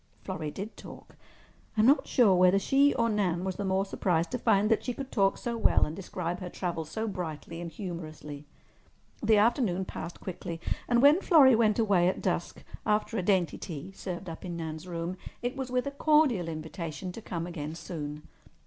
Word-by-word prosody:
Florrie 155 - -4
did 200 +8 -7
talk. - - -12 0.6
I'm 215 - +5
not 280 +5 +4
sure 235 -7 +5
whether 180 +1 +5
she 275 +8 +4
or 230 - +2
Nan 190 -5 0
was 190 -1 -3
the 205 - -2
more 190 0 +1
surprised 175 -4 0
to 250 - -2
find 215 -2 +3
that 225 - +2
she 250 - -3
could 270 -1 -6
talk 195 -3 +2
so 235 -1 -3
well - - +4
and 155 - -6
describe 180 -2 -4
her 180 - -6
travels 170 -4 -4
so 220 +4 -3
brightly 165 -3 -5
and 170 - -5
humorously. 155 -5 -7 0.7
The 220 -1 +4
afternoon 205 -4 +2
passed 175 - -7
quickly, 170 -2 -6 0.3
and 240 +1 +3
when 300 +6 +7
Florrie 280 -10 +7
went 220 -2 +3
away 200 -6 +3
at 185 - 0
dusk, - - -2 0.2
after 215 +1 0
a 205 - +1
dainty 180 -4 +1
tea 165 +2 -7
served 185 -1 -6
up 165 -1 -7
in 175 -2 -5
Nan's 160 +1 -6
room, 170 +1 -4 0.3
it 245 +1 -2
was 265 -1 -4
with 250 +1 0
a 280 - -2
cordial 280 - +3
invitation 160 +1 -5
to 225 - -9
come 170 -5 -4
again 160 -3 -5
soon. 150 -3 -6
190 Hz, 195 wpm, -29 LUFS, 170-225 Hz, 0.7 s, when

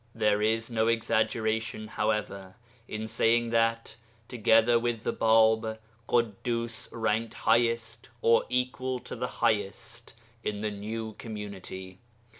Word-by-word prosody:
There 105 -1 +2
is 115 +2 0
no 110 -1 +1
exaggeration, 110 -1 0
however, 100 -3 -2 0.3
in 110 +1 -4
saying 115 +1 +2
that, 115 0 +1 0.3
together 115 0 +4
with 120 -2 -2
the - - -1
Bāb, 110 0 +3 0.3
Ḳuddus 115 0 -1
ranked 115 0 -1
highest 115 -1 +1
(or 115 0 +4
equal 125 +1 -1
to 125 - -7
the 125 - -2 0.2
highest) 105 -4 -2 0.3
in 105 -1 -3
the 105 0 -1
new 110 +2 -5
community. 95 -4 -7
110 Hz, 115 wpm, -28 LUFS, 105-115 Hz, 0.3 s, together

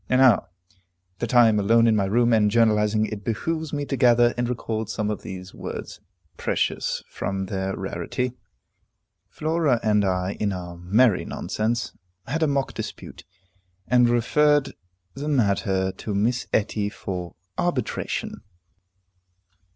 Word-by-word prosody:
And 130 - +3
now 125 -7 +5 0.7
that 120 +1 -2
I 120 -1 +8
am 105 -2 +3
alone 115 +3 +4
in 115 -1 +4
my 100 -2 +2
room, 120 +4 +2
and 105 -2 +4
journalizing, 110 -1 +3
it 105 -2 -6
behooves 155 +8 -2
me 145 -1 -2
to 140 - -2
gather 120 -1 +5
up - - -12
and 120 0 -1
record 110 -3 -3
some 105 -1 -1
of 105 - -4
those 95 0 -8
words, - - -7 0.4
precious - - -1
from 95 -1 -3
their 95 0 -3
rarity. 95 +7 -3 1.0
Flora 155 -5 +1
and 105 -1 +3
I, 95 0 -1
in 100 -2 0
our 90 -1 -6
merry 100 +5 +3
nonsense, 115 +2 -2 0.3
had 155 +8 -2
a 160 - +3
mock 140 -1 -1
dispute, - - -8 0.6
and 125 -1 +4
referred 145 +4 +3 0.4
the 145 +2 -5
matter 100 -7 +1
to 105 +2 -5
Miss 120 +5 0
Etty 105 -1 0
for 90 -4 -6 0.2
arbitration. - - -2
110 Hz, 145 wpm, -24 LUFS, 100-125 Hz, 1.0 s, I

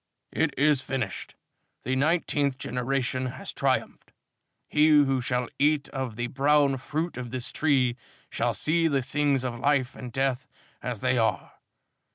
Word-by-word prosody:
"It - - +1
is 145 -1 +3
finished. 130 -8 -4 0.5
The 130 +2 -1
nineteenth 145 -2 +1
generation 130 0 -1
has 125 - -6
triumphed. - - -1 0.6
He 150 +1 +4
who 140 -4 +4
shall 125 0 -1
eat 150 0 +2
of 130 -5 -4
the 120 +1 -2
brown 140 +2 +2
fruit 155 +4 -3
of 125 -1 -5
this 130 0 -5
tree, 135 -6 +2 0.3
shall - - -1
see 165 +1 +1
the 140 -4 +1
things 140 0 +1
of 120 -2 -4
Life 135 -1 +1
and 125 -1 -8
Death 130 0 -1 0.3
as 125 -4 -4
they 130 -1 +2
are. 110 - 0
135 Hz, 150 wpm, -27 LUFS, 125-145 Hz, 0.6 s, He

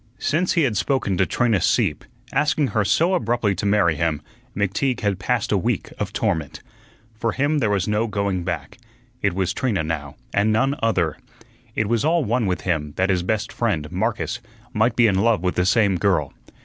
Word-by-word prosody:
Since 170 +5 0
he 170 - +3
had 120 -6 +1
spoken 130 -8 0
to 95 - +2
Trina 115 -7 +1
Sieppe, 95 - +1 0.3
asking 150 -2 +2
her 110 -3 +1
so 165 - +2
abruptly 115 - +1
to 95 +2 -2
marry 100 -5 +3
him, 80 -2 0 0.4
McTeague 105 +6 0
had 100 -3 0
passed - - -1
a - - +3
week - - -2
of - - -2
torment. 80 -3 -2 0.5
For 110 +1 -2
him 145 +3 +1
there 115 -6 +1
was 100 -3 0
no 105 +2 +1
going 100 -4 -1
back. 85 -2 -5 0.4
It - - +1
was 95 -1 0
Trina 105 -9 0
now, 75 -3 -4 0.2
and 100 +2 +2
none 135 +6 +2
other. 90 -9 +1 0.6
It 110 - +1
was 115 +2 +1
all 160 -1 +2
one 115 0 +1
with 90 -1 -1
him 75 -5 -2
that 95 +1 +1
his 90 -2 +1
best 105 +4 -2
friend, 85 -10 -1
Marcus, 110 +5 -2 0.3
might 110 +2 +2
be 120 - +4
in 100 -4 +3
love 115 -3 +2
with 90 - +1
the 90 0 +1
same 100 -2 +3
girl. 90 -9 +1
105 Hz, 195 wpm, -22 LUFS, 90-120 Hz, 0.6 s, be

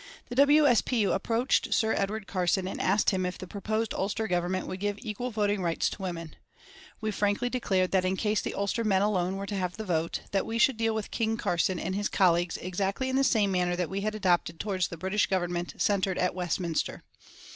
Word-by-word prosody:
The 245 - -5
W. 290 +3 +6
S. 245 -5 +5
P. 245 -3 0
U. 200 - +2
approached 230 +6 +1
Sir 220 -1 +2
Edward 205 +1 -2
Carson 185 0 0
and - - -4
asked 195 +3 +3
him 185 -2 0
if 180 0 -3
the - - -7
proposed 215 +4 -2
Ulster 205 +3 -1
Government 180 0 -1
would 185 - -5
give 205 0 -1
equal 225 +3 -4
voting 205 -3 0
rights 170 -2 0
to - - -8
women. 170 -4 -5 0.7
We 215 -1 -1
frankly 210 +4 0
declared 190 -7 +1
that 190 -1 +3
in 185 +1 0
case 210 0 +1
the - - -4
Ulster 200 +3 -1
men 195 -3 +2
alone 190 -3 +1
were 195 0 -4
to 205 - -5
have 180 -2 -2
the 220 - -5
vote, 165 -3 -1
that 195 - 0
we 225 - -2
should 235 +1 +4
deal 225 -1 +1
with 215 -2 -4
"King 225 -1 0
Carson" 175 -2 0
and 185 - -3
his 205 +2 -1
colleagues 175 -2 +2
exactly 195 +7 -2
in 260 - -1
the 270 - +3
same 210 -6 +3
manner 180 -1 +1
that 175 -1 -2
we 195 +1 -2
had 215 +1 -2
adopted 175 -5 +1
towards 190 -4 -1
the 170 - -8
British 190 +5 +1
Government 175 -2 -2
centred 195 -2 +1
at 180 - +1
Westminster. 175 -2 -2
195 Hz, 220 wpm, -28 LUFS, 180-215 Hz, 0.7 s, W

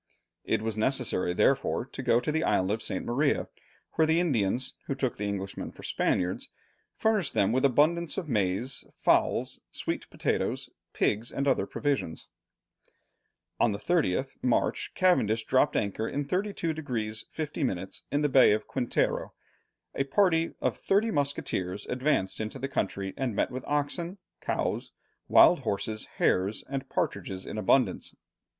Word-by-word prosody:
It - - 0
was 110 -1 -2
necessary 125 -7 +1
therefore 135 0 +2
to 135 - -7
go 120 -2 +3
to 150 - -2
the 160 +1 0
island 95 +1 +2
of 110 +1 -1
St. - - -2
Maria, 140 +5 +1 0.4
where 160 - +2
the 160 +1 +3
Indians, 125 - 0
who 135 - -1
took 130 -3 -1
the 105 - -2
Englishmen 100 -1 -4
for - - -14
Spaniards, 90 0 0 0.5
furnished 210 -9 +1
them 100 - +3
with 130 +2 +1
abundance 155 +6 +2
of 185 -5 -3
maize, 105 +2 0
fowls, - - +2
sweet - - -4
potatoes, - - -1 0.2
pigs, 110 +3 0
and 140 +1 -1
other 135 - +2
provisions. 140 - -2 1.3
On 110 - +3
the - - -3
30th 135 - 0
March, 125 -2 +1
Cavendish 115 - +3
dropped 130 +3 +3
anchor 110 +2 -1
in 145 +1 -2
32 185 -2 -1
degrees 115 -8 -4
50 155 -1 -4
minutes 95 -6 -3
in 145 +1 +1
the - - +4
Bay 130 -6 +6
of 110 0 -1
Quintero. 125 -3 -1 0.6
A 135 - 0
party 165 +2 +2
of - - +1
thirty 215 +3 +1
musketeers 105 - -2
advanced 125 -7 0
into 110 +4 -4
the 135 +1 -3
country 100 -7 -2
and 130 -5 -1
met - - +1
with 130 +1 -5
oxen, 155 +6 -1 0.2
cows, - - -2 0.3
wild - - +7
horses, 110 +2 -3
hares, 95 +3 +1
and 135 0 -4
partridges 95 0 -2
in 110 - -5
abundance. 125 +6 +2
130 Hz, 150 wpm, -28 LUFS, 105-150 Hz, 1.3 s, wild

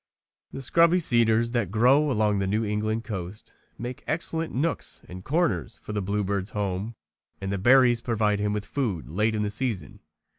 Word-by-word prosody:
The 135 - -7
scrubby 170 +6 +4
cedars 115 -5 +3
that 120 -6 0
grow 130 +8 +4
along 105 -5 +1
the 95 - -1
New 110 +3 0
England 110 +2 -1
coast 95 -2 -7 0.2
make 120 +1 -6
excellent 165 -1 -1
nooks 155 +7 -2
and 90 +1 -9
corners 125 - 0
for 105 - -6
the 105 - -1
bluebird's 100 0 -2
home 100 +3 -2 0.4
and 95 0 -4
the 100 - -2
berries 120 +2 +5
provide 105 -3 0
him 105 0 0
with 105 0 -3
food 115 - -3
late 105 +5 +1
in 105 - 0
the 105 - -2
season. 105 -3 -3
110 Hz, 175 wpm, -26 LUFS, 100-125 Hz, 0.4 s, berries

